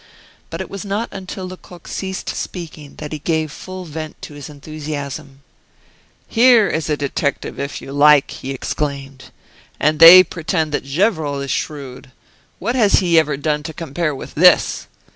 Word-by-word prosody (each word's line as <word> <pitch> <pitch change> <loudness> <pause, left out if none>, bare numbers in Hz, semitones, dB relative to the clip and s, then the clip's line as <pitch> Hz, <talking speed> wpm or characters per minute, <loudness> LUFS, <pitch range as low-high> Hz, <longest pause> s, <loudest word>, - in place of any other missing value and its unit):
But - - -5
it - - -7
was 200 - -6
not 205 +3 -3
until 190 0 -7
Lecoq 180 -2 -12
ceased 190 -1 -5
speaking 155 -5 -7
that 150 -1 -8
he 155 - -4
gave 160 0 -1
full 185 +3 -8
vent 155 -1 -7
to - - -8
his 145 -1 -9
enthusiasm: 145 -2 -7 0.8
"Here 235 -2 +5
is 155 -2 -2
a 150 - 0
detective 140 0 -3
if 140 0 -5
you - - -9
like!" 145 0 +5
he 130 - -8
exclaimed. 135 0 -4 0.5
"And 155 0 +1
they 170 +3 +11
pretend 160 -2 -2
that 145 - -2
Gevrol 155 -2 0
is 140 -1 -4
shrewd! 135 -4 -5 0.5
What 235 - -2
has 220 -6 +3
he 170 -4 +4
ever 150 -3 0
done 150 +1 -1
to 160 +1 -7
compare 160 -1 -3
with - - -9
this? 180 +3 +4
155 Hz, 160 wpm, -19 LUFS, 145-180 Hz, 0.8 s, they